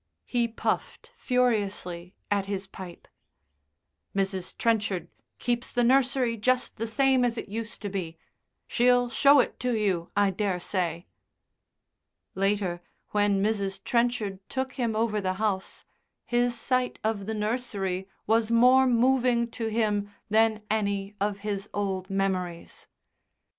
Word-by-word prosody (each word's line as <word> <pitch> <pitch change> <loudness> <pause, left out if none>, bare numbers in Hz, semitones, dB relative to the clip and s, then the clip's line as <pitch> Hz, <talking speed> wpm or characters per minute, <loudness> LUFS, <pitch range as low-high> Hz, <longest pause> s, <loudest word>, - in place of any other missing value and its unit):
He 240 -2 +1
puffed 465 - -3
furiously 205 -8 -1 0.2
at 200 -1 +1
his 195 -1 -3
pipe. 190 -2 -10 1.1
"Mrs. 190 -2 -2
Trenchard 210 -5 0 0.3
keeps 240 0 -1
the 245 - +1
nursery 250 -1 +3
just 255 +4 0
the 230 +1 -2
same 260 +3 +3
as 240 -1 0
it - - -5
used 225 +1 -6
to 205 - -2
be. 175 -4 -4 0.5
She'll 245 0 +3
show 280 +2 +6
it - - 0
to 250 -1 0
you, 190 -6 0
I 200 -1 +4
daresay." 180 -3 -2 1.3
Later, 195 -3 0 0.3
when 205 -1 +2
Mrs. 200 -2 -1
Trenchard 235 -5 0
took 260 0 -2
him 235 -4 -1
over 215 -1 +1
the 185 -1 0
house, 195 -1 -2 0.4
his 240 0 +1
sight 255 +1 0
of 215 -2 -1
the 220 - -2
nursery 210 -4 -2 0.2
was 225 +1 +2
more 250 +3 +6
moving 245 -1 +3
to 225 -1 -3
him 210 -2 0 0.2
than 220 0 +3
any 200 -2 -1
of 200 -1 -1
his 205 -1 -3
old 195 -2 -2
memories. 185 -3 -2
215 Hz, 130 wpm, -27 LUFS, 195-240 Hz, 1.3 s, show